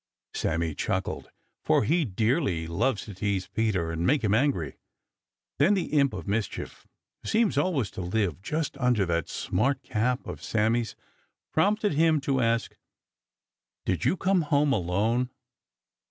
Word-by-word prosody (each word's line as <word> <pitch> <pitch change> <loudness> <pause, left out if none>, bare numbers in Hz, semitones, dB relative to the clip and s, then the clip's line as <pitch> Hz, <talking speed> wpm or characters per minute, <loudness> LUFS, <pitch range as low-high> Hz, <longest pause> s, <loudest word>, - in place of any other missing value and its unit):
Sammy 80 0 -1
chuckled, - - -2 0.3
for - - +3
he 165 +7 +2
dearly 110 - 0
loves 105 +8 0
to 105 - -8
tease 95 -1 -1
Peter 95 -6 -1
and 80 0 -3
make 135 +6 +2
him 105 -2 +2
angry. 110 - +1 0.8
Then 165 +9 +5
the 185 -5 -2
imp 140 -4 +3
of 90 -4 -7
mischief, 105 +2 -3 0.3
who - - -6
seems 220 -2 +2
always 145 - +1
to - - -6
live 90 -2 -1
just 155 +8 -2
under 125 -6 +2
that 85 -2 -1
smart 130 +8 0
cap 125 +4 -1
of - - -7
Sammy's, 115 +2 0 0.6
prompted 205 +4 +2
him 160 +1 +3
to 135 -1 0
ask: 115 0 0 1.1
"Did 90 -5 -1
you 185 - +2
come 190 0 +2
home 145 -2 +2
alone?" 110 +6 +1
115 Hz, 145 wpm, -27 LUFS, 95-145 Hz, 1.1 s, Then